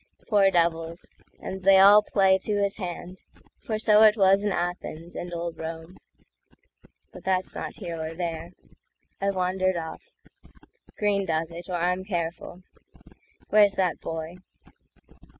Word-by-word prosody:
Poor 200 -3 +5
devils! 165 -1 -1 0.3
and 190 0 -6
they 195 +1 +6
all 200 +2 +8
play 190 -2 +2
to 210 +2 -2
his 200 -1 0
hand; 180 -1 -7 0.4
For 220 - -3
so 215 -1 +4
it 215 0 +6
was 195 0 +4
in 205 - 0
Athens 175 -2 -4
and 175 - -6
old 170 -1 -5
Rome.But 165 +2 -13
that's 185 -1 -1
not - - -6
here 170 -5 -6
or 160 +1 -5
there; 165 -1 -4 0.7
I've 200 0 0
wandered 185 0 0
off. 170 - -8 0.8
Greene 200 -2 0
does 160 0 -1
it, 170 +2 -8
or 180 - -2
I'm 180 +2 0
careful. 175 -1 -5 0.9
Where's 205 -2 +5
that 180 -4 0
boy? 165 +2 -6
180 Hz, 135 wpm, -26 LUFS, 170-195 Hz, 0.9 s, all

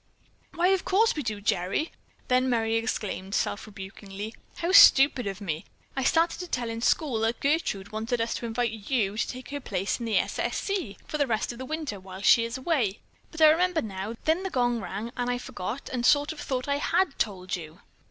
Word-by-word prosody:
"Why, 350 +2 +3
of 385 -1 +2
course 435 +4 +3
we 300 - -2
do, 215 -5 -3
Gerry." 200 - 0 0.4
Then 255 +1 +3
Merry 225 -2 +1
exclaimed 210 -4 -2
self 205 - -1
rebukingly: 200 +1 -8 0.2
"How 340 +2 -1
stupid 270 - +7
of 195 0 -4
me! 170 -4 -3 0.3
I 265 - -1
started 330 +5 +2
to 360 - -5
tell 240 -7 -2
in 225 0 -5
school 255 -2 +1
that 225 +2 0
Gertrude 275 - 0
wanted 225 +3 -2
us 230 0 0
to 235 - -4
invite 230 0 0 0.2
you 215 -7 +1
to 220 - 0
take 255 0 -7
her 285 0 -4
place 195 -5 -2
in 235 - -4
the 215 -3 +2
'S. - - -1
S. - - -1
C.' 380 - -3
for 305 - -4
the 285 - +2
rest 220 -1 0
of 240 - -10
the 260 - -5
winter, 305 -9 -4
while 190 +1 -10
she 230 - +6
is 230 +2 -3
away, 260 - 0 0.3
but 320 - -7
I 310 - +9
remember 355 +1 +2
now, 200 +1 -5
the 360 +5 +1
gong 245 -2 +1
rang, 210 +5 -5
then 245 -1 -1
I 245 - 0
forgot 245 0 -6
and 245 -2 -1
sort 290 +3 +4
of 315 - -9
thought 255 -2 -3
I 280 0 +1
had 340 +1 +1
told 185 -4 -1
you." 165 +1 -10
240 Hz, 215 wpm, -27 LUFS, 205-290 Hz, 0.4 s, I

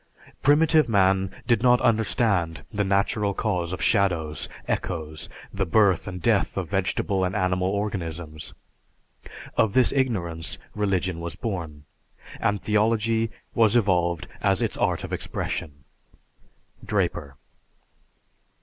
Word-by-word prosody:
"Primitive 155 0 +4
man 95 -2 +3 0.2
did 120 -3 +2
not 125 0 +5
understand 100 - +1
the 105 0 +1
natural 100 +1 +1
cause 90 -6 -1
of 90 - -3
shadows, 85 -7 +1 0.2
echoes, 80 -2 -3 0.2
the 95 - 0
birth 95 0 +3
and 90 -2 -5
death - - +1
of - - -2
vegetable 95 -1 0
and 90 +2 -1
animal 90 -2 +1
organisms. 85 -6 -4 1.0
Of 105 -3 +2
this 130 -2 +4
ignorance 90 - -1 0.2
religion 95 -4 -1
was 85 -1 -5
born, 85 -9 -5 0.6
and 105 0 +1
theology 110 +1 +2 0.2
was 115 -1 +4
evolved 90 -7 +2
as - - +2
its - - -1
art - - 0
of - - -6
expression." 70 -2 -4 1.0
(_Draper. 85 -8 -1
95 Hz, 115 wpm, -25 LUFS, 85-110 Hz, 1.0 s, not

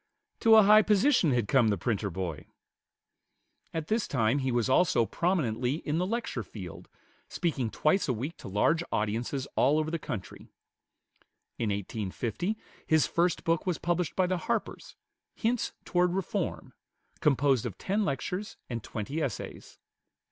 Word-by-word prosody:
To 225 -1 +6
a 220 - +8
high 210 +2 +8
position 215 - +3
had 120 -5 +1
come 125 -1 +4
the 105 -2 +1
printer 105 -3 -1
boy. 85 -4 -5 1.2
At 160 -1 -3
this 220 0 0
time 125 +1 +1
he 130 -1 -1
was 120 -2 +1
also 130 -4 +3
prominently 130 - 0
in 155 0 -2
the 180 - 0
lecture 230 +2 -2
field, - - -9 0.4
speaking 145 -9 -1
twice 155 - +1
a 130 - +1
week 135 +9 -4
to - - -10
large 135 - +2
audiences 115 +6 -1
all 145 +4 +4
over 155 0 0
the 165 - -2
country. 105 -9 -7 1.1
In 115 - 0
1850 110 - -3 0.3
his 155 -1 +4
first 170 -1 +1
book 165 +2 0
was 180 - +1
published 175 -2 -1
by 185 - +3
the 185 0 0
Harpers, - - -3 0.4
"Hints 235 +1 0
toward 180 0 +2
Reform," 195 -2 -3 0.5
composed 135 -4 +2
of 100 - -8
ten 205 +3 0
lectures 180 +7 -3
and 115 -1 -3
twenty 125 +10 -4
essays. 130 -8 -5
150 Hz, 150 wpm, -29 LUFS, 115-180 Hz, 1.2 s, a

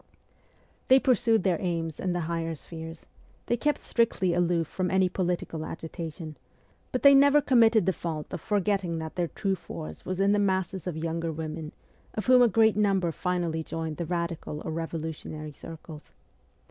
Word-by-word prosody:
They 260 +1 +7
pursued 230 -5 +3
their 180 -4 +1
aims 165 -3 -2
in 185 - -1
the 175 0 -1
higher 165 0 -2
spheres; 160 +1 -9 0.4
they 240 - +1
kept 295 +5 0
strictly 210 -6 +1
aloof 175 -1 +2
from 185 +2 -2
any 190 0 +3
political 175 -3 -2
agitation; 160 -1 -7 0.5
but 255 - -2
they 280 0 +9
never 280 +1 +6
committed 230 -7 +4
the 190 - +2
fault 160 -2 -5
of 175 - -4
forgetting 200 -4 0
that 160 -1 -5
their 175 -1 0
true 195 +3 -1
force 80 - -7
was 185 0 -4
in 195 +1 +4
the 205 - +3
masses 190 -2 0
of 170 -3 -3
younger 165 +1 -2
women, 155 0 -5 0.4
of 215 - -3
whom 255 -1 +6
a 245 - +7
great 220 0 +4
number 195 -5 +2
finally 170 -2 -1
joined 160 -1 -4
the 170 - -3
radical 170 -3 -3
or - - -3
revolutionary 160 -1 -5
circles. 155 +1 -11
175 Hz, 170 wpm, -28 LUFS, 160-200 Hz, 0.5 s, they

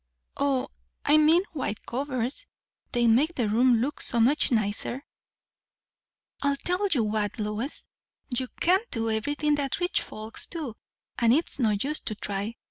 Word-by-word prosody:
"O, 275 -2 +1 0.4
I 295 +1 +6
mean 315 +4 +5
white 255 -8 -3
covers. 255 0 -3 0.4
They 240 0 +2
make 270 +9 +4
the 240 -4 0
room 235 +2 +4
look 285 +4 -2
so 235 - 0
much 275 +6 +4
nicer." 220 +4 -1 1.4
"I'll 280 0 +2
tell 360 +7 0
you 280 - +2
what, 210 -1 -1
Lois; 215 +6 -3 0.5
you 255 +1 0
can't 380 +7 +3
do 225 -1 -1
everything 290 +7 0
that 275 +7 -2
rich 355 0 +1
folks 215 +1 -7
do; 300 -10 -5 0.4
and 230 -1 +4
it's 290 +1 +1
no 230 -4 +3
use 300 +3 0
to 215 - -4
try. 205 +2 -4
255 Hz, 150 wpm, -27 LUFS, 225-295 Hz, 1.4 s, I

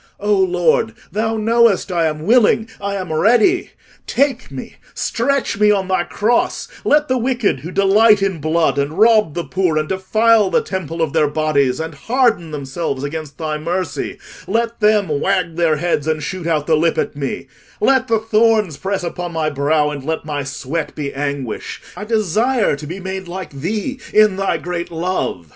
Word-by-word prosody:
O 210 +1 +1
Lord, 190 +4 +2 0.2
thou 220 +2 -1
knowest 225 -3 +2
I 170 -2 +2
am 155 0 -4
willing—I 220 -3 +2
am 185 -4 -4
ready. 235 - +3 0.4
Take 280 +1 0
me, - - -9 0.2
stretch 265 -3 -1
me 210 0 +5
on 195 -2 +2
thy 185 -2 +1
cross: 230 +4 0 0.2
let 300 0 +3
the 255 -1 +1
wicked 240 - 0
who 155 +6 -7
delight 200 +2 +4
in 190 -4 -1
blood, 155 -3 +1
and 145 +4 -2
rob 215 -6 +4
the 170 - -2
poor, 180 -4 0
and 155 0 0
defile 215 +3 +3
the - - +1
temple 165 -4 -3
of 155 - -2
their 150 - +3
bodies, 145 -3 +1
and 160 0 -4
harden 225 - +1
themselves 140 -1 -4
against 150 -1 -5
thy 155 -1 -3
mercy—let 190 +6 -3
them 210 -2 +3
wag 165 +3 0
their 165 -2 +2
heads 160 -2 -1
and 155 -1 -1
shoot 175 +2 -4
out 155 -3 0
the 160 - +3
lip 165 +1 +1
at - - -1
me: 140 -1 -4 0.3
let 260 +3 +3
the 225 - +2
thorns 220 -6 +2
press 195 -1 -3
upon 175 0 -4
my 155 -1 -1
brow, 150 +1 +1
and 145 -2 -6
let 160 +2 -3
my 145 -2 -3
sweat 135 +4 -4
be 140 -2 -4
anguish—I 140 - -5
desire 220 - +1
to 150 +1 -9
be 175 +5 -6
made 190 0 -5
like 180 0 -6
thee 210 - -3
in 215 -3 +4
thy 195 -3 0
great 175 +2 -4
love. 170 - -3
180 Hz, 175 wpm, -18 LUFS, 155-215 Hz, 0.4 s, me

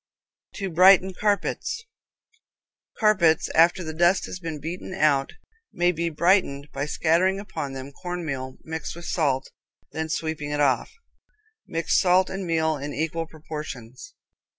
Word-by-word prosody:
To 195 -3 -4
Brighten 190 +2 +6
Carpets. 215 - -1 1.1
Carpets 180 -8 +3
after 175 +3 +4
the 160 -1 -5
dust 175 +4 +3
has 185 - -7
been 165 -4 -5
beaten 175 +5 -6
out 145 -6 +2 0.4
may 175 0 +2
be 170 0 -2
brightened 155 -4 +2
by 140 +2 -2
scattering 175 +5 +2
upon 165 -9 -5
them 135 +1 -7
cornmeal 145 -6 -5
mixed 160 0 -5
with 170 0 -9
salt 140 -7 0 0.4
and - - -7
then 160 0 -2
sweeping 160 -3 -3
it 145 0 -2
off. 135 -4 +2 0.8
Mix 165 0 +1
salt 185 0 +3
and 190 -1 -4
meal 160 -2 +1
in 145 +1 -6
equal 165 +2 -2
proportions. 150 - -8
165 Hz, 140 wpm, -25 LUFS, 150-185 Hz, 1.1 s, Brighten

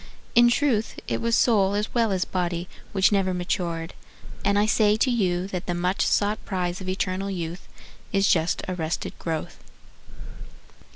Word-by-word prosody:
In 240 0 +7
truth 240 -3 +1
it - - -1
was 230 0 +2
soul 200 -5 +3
as 210 +1 -2
well 230 -3 +2
as 185 -1 0
body 175 -1 -2 0.2
Which 195 0 +3
never 190 -2 +1
matured, 170 -2 -2 0.5
and 200 0 +2
I 205 - +4
say 215 -1 +3
to 255 - +2
you 185 -6 +1
That 180 -2 -5
the 175 - -1
much 180 +2 0
sought 210 +1 +1
prize 180 -2 -2
of 185 - -5
eternal 185 +1 -2
youth 175 -1 -5 0.4
Is 195 0 +3
just 165 0 +2
arrested 170 -3 -3
growth. 160 -2 -4
190 Hz, 160 wpm, -25 LUFS, 175-210 Hz, 0.5 s, In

